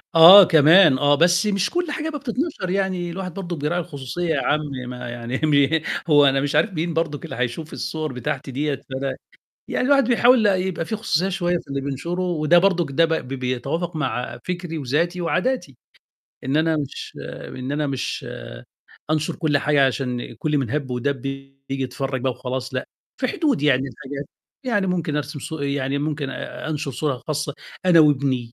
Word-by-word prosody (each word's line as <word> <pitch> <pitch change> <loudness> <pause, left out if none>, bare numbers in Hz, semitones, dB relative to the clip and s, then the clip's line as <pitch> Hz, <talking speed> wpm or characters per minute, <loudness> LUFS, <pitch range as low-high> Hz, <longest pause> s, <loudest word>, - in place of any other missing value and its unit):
آه، 175 +5 +11
كمان 160 -2 +6
آه، 145 +1 +4
بس 175 +5 +3
مش 200 -1 +1
كل 350 -3 -1
حاجة 310 +2 -3
بقى 295 -2 -5
بتتنشر، 255 - -3
يعني 185 -2 -1
الواحد 185 -1 -5
برضه 180 -2 -5
بيراعي 150 +3 -1
الخصوصية 155 +1 -5
يا 150 -4 +1
عَم 150 - +2 0.3
ما 125 -1 -6
يعني 120 +2 -4
مه 150 +1 +3 0.3
هو 145 -1 +6
أنا 135 0 +3
مش 145 +1 -1
عارف 165 +7 +2
مين 165 0 -2
برضُك 155 -4 -2
اللي - - -7
هيشوف 125 +6 -3
الصور 155 -3 -4
بتاعتي 135 +2 -4
دِيّة، 145 +2 -1
فده 135 0 -5 0.5
يعني - - 0
الواحد 275 0 +5
بيحاول 240 -1 +5
يبقى 185 -4 +1
في 220 - -3
خصوصية 190 -4 0
شوية 175 -2 0
في 170 - -11
اللي 140 0 -3
بينشره 140 +6 -3
وده 175 -2 +3
برضُك، 175 -4 +2
ده 165 +5 +4
ب 165 - -1
ب 160 - -2
بيتوافق 135 +7 -3
مع 125 -5 -3
فكري 175 -2 -4
وذاتي 160 +6 -1
وعاداتي، 185 - -1 0.7
إن 135 +3 0
أنا 160 0 +2
مش 145 -3 -5 0.3
إن 130 +2 -6
أنا 150 0 0
مش 135 -2 -3 0.8
أنشُر 155 -1 0
كل 150 -4 +1
حاجة 145 -1 +3
عشان 125 -2 -3
كل 150 -1 0
من 130 -5 -2
هَب 140 -1 -2
ودَب 130 +2 -2
ييجي 135 0 -6 0.3
يتفرّج 130 +1 -3
بقى 130 +1 0
وخلاص 130 +1 -5
لأ، 130 - -2 0.3
في 255 - +1
حدود 285 - 0
يعني 135 -3 +3
لحاجات، 140 +1 -7 0.4
يعني 205 -6 +1
ممكن 170 -5 -1
أرسم 150 +1 -4
صو 160 +2 -6
يعني 140 -1 -1
ممكن 145 -1 -2
أ - - -6
أنشُر 150 -2 -3
صورة 135 -2 -2
خاصة 150 -1 -2 0.3
أنا 170 -2 +7
وابني، 135 -5 +2
150 Hz, 180 wpm, -22 LUFS, 135-175 Hz, 0.8 s, آه